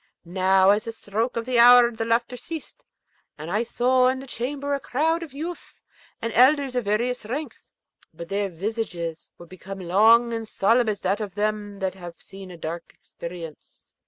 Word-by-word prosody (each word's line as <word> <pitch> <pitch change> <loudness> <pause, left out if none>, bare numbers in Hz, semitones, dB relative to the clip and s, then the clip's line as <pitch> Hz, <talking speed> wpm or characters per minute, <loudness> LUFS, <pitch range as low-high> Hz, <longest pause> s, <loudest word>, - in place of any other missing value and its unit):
Now, 190 +2 +4
at 210 +2 0
a - - -2
stroke 225 +2 -3
of 230 - -2
the 250 -1 +1
hour 240 0 +8
the 225 -1 -4
laughter 235 +2 0
ceased, 320 +4 -8 0.5
and 155 +3 -7
I 210 +3 +1
saw 250 +2 +2
in 260 +1 +1
the 265 - -8
chamber 280 +3 -3
a 280 - 0
crowd 320 +6 0
of 330 -4 -8
youths 325 +6 -7 0.4
and 230 -1 -2
elders 270 +1 +4
of 245 -3 -1
various 235 +5 0
ranks; 255 +3 -6 0.4
but 170 +1 -9
their 200 +2 -1
visages 175 -3 -4
were 175 - -12
become 190 +2 -9
long 220 +6 +4
and 225 -1 -4
solemn 230 +3 +2
as 205 -2 -3
that 195 +3 0
of 200 -3 -6
them 210 -1 -2
that 190 -1 -1
have 175 -2 -10
seen 195 -1 -11
a 175 - -10
dark 165 +1 -7
experience. 170 -3 -10
220 Hz, 185 wpm, -24 LUFS, 190-250 Hz, 0.5 s, hour